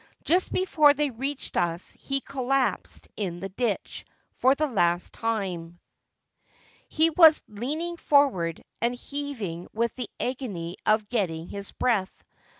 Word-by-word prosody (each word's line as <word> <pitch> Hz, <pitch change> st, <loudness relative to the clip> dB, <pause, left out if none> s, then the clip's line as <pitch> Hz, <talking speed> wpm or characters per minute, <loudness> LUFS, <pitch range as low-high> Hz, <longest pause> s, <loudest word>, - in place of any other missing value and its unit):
Just 360 Hz, +3 st, +2 dB
before 305 Hz, -6 st, +4 dB
they 295 Hz, -2 st, 0 dB
reached 270 Hz, +4 st, -4 dB
us 170 Hz, +1 st, -1 dB
he 275 Hz, 0 st, -1 dB
collapsed 270 Hz, 0 st, -1 dB
in 180 Hz, -5 st, -3 dB
the 195 Hz, +2 st, -5 dB
ditch 215 Hz, +1 st, -2 dB, 0.2 s
— -, -, -45 dB
for 260 Hz, +2 st, +5 dB
the 305 Hz, -, +1 dB
last 175 Hz, -, +1 dB
time. 185 Hz, -7 st, -3 dB, 1.1 s
He 320 Hz, +1 st, +3 dB
was 320 Hz, -1 st, +7 dB
leaning 300 Hz, +11 st, -4 dB
forward 255 Hz, -, +2 dB, 0.2 s
and 240 Hz, +1 st, +1 dB
heaving 245 Hz, -, -5 dB
with 230 Hz, +2 st, 0 dB
the 250 Hz, -4 st, -5 dB
agony 200 Hz, -10 st, -4 dB
of 215 Hz, -1 st, +3 dB
getting 175 Hz, -8 st, -1 dB
his 200 Hz, 0 st, -6 dB
breath. 210 Hz, -7 st, -1 dB
235 Hz, 135 wpm, -26 LUFS, 185-280 Hz, 1.1 s, was